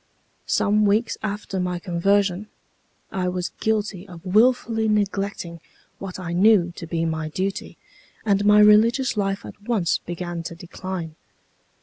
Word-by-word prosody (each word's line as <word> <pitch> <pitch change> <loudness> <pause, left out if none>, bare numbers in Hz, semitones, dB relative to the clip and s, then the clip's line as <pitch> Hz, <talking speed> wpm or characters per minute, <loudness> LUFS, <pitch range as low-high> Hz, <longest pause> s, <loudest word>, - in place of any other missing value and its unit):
"Some 210 +1 +2
weeks 215 +3 +2
after 205 -2 -4
my 180 -1 -1
conversion 190 +3 +1 0.6
I 185 -1 -1
was 180 0 -3
guilty 210 -3 -1
of 175 -1 -12
wilfully 225 +2 +3
neglecting 200 -4 -1 0.4
what 190 -1 -7
I 175 -2 -4
knew 185 -1 +4
to 165 - -7
be 165 0 -1
my 160 -1 -2
duty, 190 +5 -4 0.5
and 200 -1 +2
my 210 0 +6
religious 230 +5 +5
life 195 -1 -1
at - - -11
once 205 -6 0
began 175 0 -5
to 165 0 -7
decline. 175 -1 -6
195 Hz, 135 wpm, -23 LUFS, 175-210 Hz, 0.6 s, my